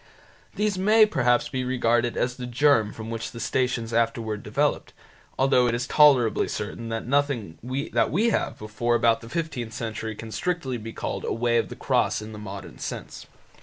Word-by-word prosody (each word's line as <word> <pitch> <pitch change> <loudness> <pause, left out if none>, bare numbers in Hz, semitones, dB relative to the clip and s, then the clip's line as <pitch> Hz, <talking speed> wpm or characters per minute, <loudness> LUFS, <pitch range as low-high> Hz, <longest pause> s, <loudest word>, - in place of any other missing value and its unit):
These 205 -1 0
may 215 +3 +6
perhaps 125 - +2
be 130 -3 -3
regarded 120 -2 +1
as 125 - 0
the 125 -1 -6
germ 120 -4 +3
from 110 +1 -7
which 115 0 -4
the 115 - -9
Stations 115 0 -1
afterwards 115 -2 0
developed, - - -1 0.4
though 130 -2 +4
it 120 - +1
is 120 +1 -2
tolerably 130 -5 +4
certain 115 +2 -5
that 115 0 -3
nothing 135 - 0 0.3
that - - +3
we 215 +9 +2
have - - -1
before 110 +3 -1
about 115 -1 +3
the 115 - -10
fifteenth 125 -8 -3
century 110 -1 -4
can 110 +1 -9
strictly 135 - -2
be 115 +1 -7
called - - -4
a - - -2
Way 120 0 +1
of - - -2
the - - -7
Cross - - 0
in 110 - -8
the 105 - -8
modern 100 -1 -8
sense. - - -6
120 Hz, 185 wpm, -25 LUFS, 115-135 Hz, 0.4 s, may